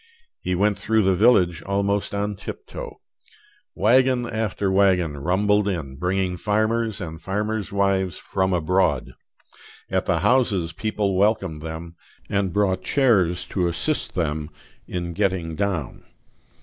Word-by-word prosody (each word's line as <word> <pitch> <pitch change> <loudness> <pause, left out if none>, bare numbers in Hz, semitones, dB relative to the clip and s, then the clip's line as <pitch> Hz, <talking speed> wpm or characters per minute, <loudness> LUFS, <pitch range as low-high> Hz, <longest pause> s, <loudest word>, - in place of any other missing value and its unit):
He 90 - -1
went 100 +2 +1
through 110 0 +2
the 95 0 +3
village 90 -5 +4
almost 100 +1 -1
on 100 0 -2
tiptoe. - - -8 0.8
Wagon 125 +3 +3
after 105 -4 -1
wagon 95 -5 +3
rumbled 105 +6 +2
in, 75 -9 -3
bringing 90 0 0
farmers 110 +1 0
and 80 -3 -7
farmers' 105 +3 -2
wives 100 -2 +1
from 95 0 -1
abroad; 85 -5 +1 0.8
at - - 0
the - - +1
houses 100 -10 +2
people 105 0 -1
welcomed 95 -5 +1
them, 80 +1 -7 0.4
and 100 -2 +1
brought 95 -1 +1
chairs 100 - +2
to 90 -3 0
assist 115 - -1
them 75 -3 -2 0.4
in 85 -1 -4
getting 95 -4 -1
down. 90 -5 -3
95 Hz, 125 wpm, -23 LUFS, 85-105 Hz, 0.8 s, village